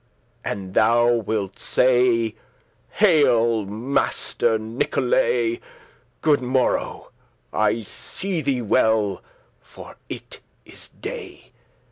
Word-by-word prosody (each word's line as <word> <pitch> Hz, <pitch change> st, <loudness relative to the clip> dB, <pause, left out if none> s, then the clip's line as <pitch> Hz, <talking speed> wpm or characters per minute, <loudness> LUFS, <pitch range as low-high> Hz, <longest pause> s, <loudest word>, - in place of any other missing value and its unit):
And 95 Hz, -2 st, -5 dB
thou 120 Hz, +3 st, +4 dB
wilt 110 Hz, -4 st, -2 dB
say, 120 Hz, -3 st, +2 dB, 0.6 s
'Hail, 120 Hz, -, +3 dB
Master 115 Hz, 0 st, 0 dB
Nicholay, 355 Hz, -, 0 dB, 0.6 s
Good 150 Hz, -3 st, +3 dB
morrow, 130 Hz, +1 st, -1 dB, 0.4 s
I 110 Hz, +1 st, +1 dB
see 185 Hz, -, -4 dB
thee 135 Hz, -4 st, -1 dB
well, 105 Hz, -2 st, +2 dB, 0.4 s
for -, -, -13 dB
it -, -, -8 dB, 0.3 s
is -, -, -11 dB
day. -, -, -9 dB
120 Hz, 85 wpm, -22 LUFS, 110-135 Hz, 0.6 s, thou